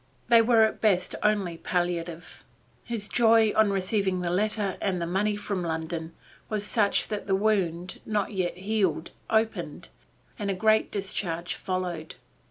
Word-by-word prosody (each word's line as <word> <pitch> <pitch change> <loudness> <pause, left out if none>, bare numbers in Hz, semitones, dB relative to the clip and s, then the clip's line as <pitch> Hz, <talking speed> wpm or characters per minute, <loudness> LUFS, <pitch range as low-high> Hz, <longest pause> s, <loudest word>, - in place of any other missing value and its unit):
They 230 -1 +7
were 225 -1 +5
at 220 - 0
best 190 -5 +2
only 200 -5 +1
palliative. 175 -1 -3 0.4
His 225 -3 -3
joy 225 -2 +4
on 220 -1 +4
receiving 195 -1 0
the 175 -1 -1
letter 205 0 0
and 190 -2 0 0.2
money 205 +2 +1
from 205 -2 -3
London 160 0 -4 0.3
was 210 -1 -2
such 210 -2 +2
that 210 -1 -4
the 195 - +3
wound, 190 -4 0
not 210 -1 -1
yet 185 -3 -2
healed, 195 -4 -1 0.2
opened, 220 0 -1 0.5
and 205 -1 -2
a 195 - 0
great 220 +3 +3
discharge 180 -3 -3
followed. 180 -4 -4
195 Hz, 145 wpm, -27 LUFS, 180-215 Hz, 0.5 s, They